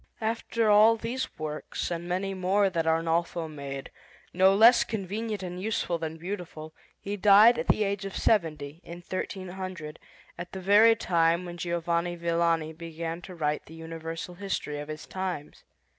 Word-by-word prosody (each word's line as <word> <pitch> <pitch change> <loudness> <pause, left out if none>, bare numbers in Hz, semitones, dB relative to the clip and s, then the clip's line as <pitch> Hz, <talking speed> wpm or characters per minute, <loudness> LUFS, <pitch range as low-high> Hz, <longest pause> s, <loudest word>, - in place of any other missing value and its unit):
After 225 0 -1
all 215 +2 +6
these 235 +4 -4
works 155 +2 -4
and 170 0 -4
many 190 +2 -1
more 190 +1 +2
that 165 -2 -1
Arnolfo 165 +1 0
made, 140 -3 -7 0.4
no 190 +2 +5
less 230 +4 +7
convenient 210 0 -4
and 180 0 -5
useful 190 -5 -1
than 160 0 -4
beautiful, 165 -3 -7 0.3
he 200 +1 -4
died 210 +4 +7
at 240 - -3
the 215 - +3
age 200 -1 -2
of 195 -1 -5
seventy, 160 -6 0
in 175 +1 -10
1300, 185 -4 -5 0.4
at 175 0 -7
the 190 - -5
very 210 +4 +6
time 170 -2 +1
when 175 0 -7
Giovanni 170 0 -1
Villani 170 -2 0
began 165 +1 -6
to 185 0 -10
write 150 -2 -2
the 160 - -12
Universal 165 +1 -6
History 150 -7 -3
of 145 - -6
his 155 0 -7
times. 185 -6 -5
175 Hz, 160 wpm, -28 LUFS, 165-200 Hz, 0.4 s, less